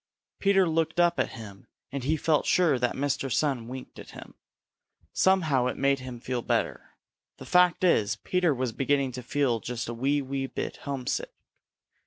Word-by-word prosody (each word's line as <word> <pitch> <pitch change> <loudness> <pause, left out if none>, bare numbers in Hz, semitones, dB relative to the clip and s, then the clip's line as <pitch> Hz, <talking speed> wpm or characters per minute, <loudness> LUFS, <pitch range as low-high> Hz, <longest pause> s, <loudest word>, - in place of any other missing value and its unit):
Peter 195 -2 +4
looked 165 +1 0
up 175 0 +3
at - - 0
him, 100 -3 -11 0.2
and 135 -1 -4
he 155 +3 +1
felt 155 0 +1
sure 160 -8 +3
that 125 -1 0
Mr. 140 -1 -1
Sun 125 -3 0
winked 130 +1 -9
at - - -11
him. - - -11 0.8
Somehow 155 -10 +3
it - - -3
made 140 0 +2
him 130 -2 -8
feel 125 0 -3
better. - - -2 0.4
The - - -10
fact 180 0 +3
is, 110 - +3
Peter 180 +7 0
was 130 -3 -1
beginning 135 +2 0
to 125 +1 -6
feel 125 -2 0
just 120 +1 -5
a 120 - -4
wee, 135 +5 +1
wee 135 0 -3
bit - - -5
homesick. 140 - -3
135 Hz, 175 wpm, -27 LUFS, 125-160 Hz, 0.8 s, Peter